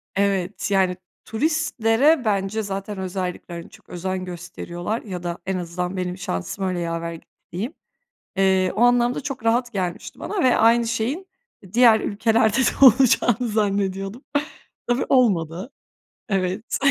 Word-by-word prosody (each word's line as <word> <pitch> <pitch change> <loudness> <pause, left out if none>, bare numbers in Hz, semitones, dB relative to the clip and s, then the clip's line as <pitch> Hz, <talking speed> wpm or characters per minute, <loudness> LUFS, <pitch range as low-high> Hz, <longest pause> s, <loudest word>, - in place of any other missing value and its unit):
Evet, 195 0 0
yani, 190 -2 +2 0.3
turistlere 285 0 +2
bence 200 +1 0
zaten 195 +1 -5
özellikle 180 -2 -5
çok - - -19
özen 185 +1 -3
gösteriyorlar 175 +4 -5
ya 185 -5 -7
da 170 0 -3
en 190 0 -1
azından 180 +1 -4
benim 180 0 -3
şansım 185 - -4
öyle 185 -1 -1
yaver 170 0 -3
gitti, 165 - -12 0.2
diyeyim. 215 - -4 0.6
Eee, 190 -1 +3
o 220 - -1
anlamda 245 +1 +3
çok 270 -5 -6
rahat 240 +2 +2
gelmişti 180 -3 -4
bana 410 -7 -2
ve 255 - +4
aynı 230 +1 +4
şeyin 245 - -2 0.5
diğer 235 -2 +6
ülkelerde 220 +1 +2
de 265 +1 +4
olacağını 245 -1 +5
zannediyordum. 200 +1 -1 0.6
Tabii 245 +2 +1
olmadı, 195 - +2 0.6
evet. 195 +2 -1
200 Hz, 130 wpm, -23 LUFS, 185-235 Hz, 0.6 s, diğer